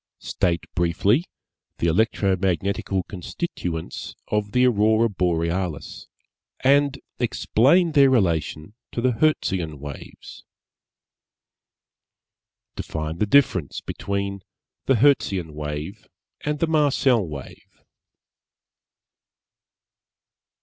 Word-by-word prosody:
_ -, -, -7 dB
_State 85 Hz, -1 st, +1 dB
briefly 95 Hz, -, +2 dB, 0.5 s
the -, -, -1 dB
electromagnetical 95 Hz, 0 st, 0 dB
constituents 90 Hz, -, -5 dB
of 105 Hz, -1 st, -1 dB
the 125 Hz, +2 st, +3 dB
Aurora 110 Hz, -1 st, +3 dB
Borealis, 85 Hz, -3 st, -2 dB, 0.5 s
and 140 Hz, +1 st, +3 dB, 0.2 s
explain 140 Hz, +8 st, +3 dB
their 140 Hz, -3 st, +6 dB
relation 85 Hz, -, 0 dB, 0.2 s
to -, -, -2 dB
the 125 Hz, +2 st, +2 dB
Hertzian 95 Hz, -, 0 dB
Waves._ 70 Hz, 0 st, -10 dB, 2.4 s
_Define 80 Hz, +1 st, -5 dB
the 105 Hz, -, +1 dB
difference 100 Hz, -, +2 dB
between 100 Hz, 0 st, -4 dB, 0.5 s
the 135 Hz, -, +4 dB
Hertzian 100 Hz, -, +2 dB
Wave 75 Hz, +7 st, -6 dB, 0.4 s
and 150 Hz, 0 st, -1 dB
the 165 Hz, -, +1 dB
Marcel 140 Hz, -7 st, +3 dB
Wave. 70 Hz, -3 st, -11 dB
100 Hz, 85 wpm, -23 LUFS, 85-125 Hz, 2.4 s, their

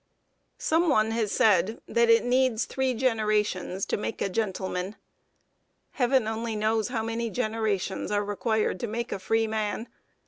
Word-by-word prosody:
] -, -, -47 dB
Some 330 Hz, +2 st, +2 dB
one 220 Hz, -5 st, +3 dB
has 225 Hz, -2 st, -1 dB
said 210 Hz, +1 st, +3 dB
that 235 Hz, 0 st, +2 dB
it 230 Hz, +1 st, +5 dB
needs 250 Hz, -2 st, +2 dB
three 265 Hz, -1 st, -1 dB
generations 215 Hz, -6 st, 0 dB
to -, -, -1 dB
make 210 Hz, -, -4 dB
a -, -, 0 dB
gentleman. 190 Hz, -1 st, -2 dB, 1.0 s
Heaven 255 Hz, -3 st, +2 dB
only 225 Hz, 0 st, -2 dB
knows 215 Hz, +1 st, +1 dB
how 235 Hz, -3 st, -2 dB
many 230 Hz, +1 st, -2 dB
generations 215 Hz, -4 st, -1 dB
are 205 Hz, 0 st, +1 dB
required 210 Hz, -1 st, 0 dB
to 235 Hz, -, -3 dB
make 235 Hz, +2 st, -4 dB
a -, -, -3 dB
freeman! 220 Hz, +2 st, -1 dB
220 Hz, 150 wpm, -27 LUFS, 210-235 Hz, 1.0 s, it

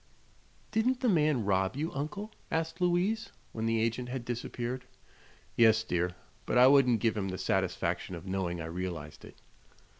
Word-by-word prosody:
"Didn't 245 Hz, +4 st, +1 dB
the 250 Hz, -, +3 dB
man 150 Hz, -, +2 dB
rob 95 Hz, 0 st, +1 dB
you, 155 Hz, +4 st, -2 dB
Uncle?" 200 Hz, +10 st, -4 dB, 0.2 s
asked 160 Hz, +2 st, -2 dB
Louise, 180 Hz, +5 st, +1 dB, 0.2 s
when 110 Hz, 0 st, -2 dB
the 115 Hz, 0 st, +2 dB
agent 115 Hz, +2 st, -1 dB
had 125 Hz, -1 st, -4 dB
disappeared. 120 Hz, +1 st, -4 dB, 0.7 s
"Yes, 110 Hz, -1 st, +5 dB
dear; 90 Hz, -3 st, -1 dB, 0.3 s
but -, -, +1 dB
I 125 Hz, -, +8 dB
wouldn't 130 Hz, -5 st, +5 dB
give 115 Hz, +1 st, +2 dB
him 100 Hz, -2 st, -2 dB
the 95 Hz, -1 st, -4 dB
satisfaction 90 Hz, -, -1 dB
of 85 Hz, +1 st, -9 dB
knowing 95 Hz, -2 st, -2 dB
I 80 Hz, -, -4 dB
realized 85 Hz, -3 st, -5 dB
it." -, -, -12 dB
120 Hz, 160 wpm, -31 LUFS, 95-155 Hz, 0.7 s, I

